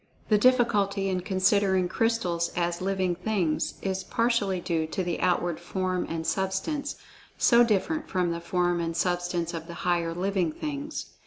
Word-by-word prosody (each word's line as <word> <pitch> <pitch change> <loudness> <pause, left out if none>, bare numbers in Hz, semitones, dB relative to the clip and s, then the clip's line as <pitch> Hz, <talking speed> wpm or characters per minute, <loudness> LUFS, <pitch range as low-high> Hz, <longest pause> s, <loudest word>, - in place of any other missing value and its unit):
The 210 - +5
difficulty 210 -5 +3
in 185 -1 0
considering 190 -1 +2
crystals 180 -5 0
as 175 0 -1
"living 190 -1 0
things" 175 -5 -1
is 190 -1 -2
partially 230 -6 +1
due 165 -2 -1
to 185 +4 -2
the 175 -1 -2
outward 175 -2 +1
form 185 +1 -2
and 160 0 -3
substance, 190 - -1 0.4
so 240 -1 +6
different 300 - 0
from 180 -2 0
the 170 - -3
form[Pg - - -16 0.3
49] - - -1
and 165 0 -3
substance 175 -1 -1
of 165 -1 -6
the 170 - -8
higher 170 -2 +1
"living 185 -3 0
things." 295 - -4
185 Hz, 160 wpm, -27 LUFS, 175-205 Hz, 0.4 s, so